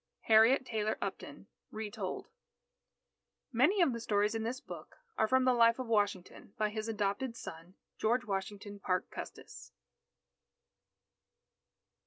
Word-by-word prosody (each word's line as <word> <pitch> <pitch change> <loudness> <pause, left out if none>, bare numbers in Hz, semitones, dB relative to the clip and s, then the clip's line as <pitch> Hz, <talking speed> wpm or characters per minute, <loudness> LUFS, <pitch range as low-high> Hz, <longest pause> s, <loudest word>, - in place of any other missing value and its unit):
Harriet 225 +5 +5
Taylor 215 -3 -1
Upton - - -6 0.2
(Retold) 215 - -5 1.3
_Many 340 - +4
of 275 - +2
the 235 - -4
stories 210 -1 +1
in 225 - -2
this 235 +3 -3
book - - -10 0.2
are 220 - +2
from 260 +2 +3
the 255 - +5
Life 230 -1 +5
of 255 - -3
Washington, 205 -4 -1
by 215 -1 +1
his 215 +1 -4
adopted 220 +3 -1
son, 165 +1 -9 0.2
George 245 +3 +2
Washington 200 0 -4
Parke 185 -2 -1
Custis. - - -9
220 Hz, 125 wpm, -33 LUFS, 205-240 Hz, 1.3 s, Harriet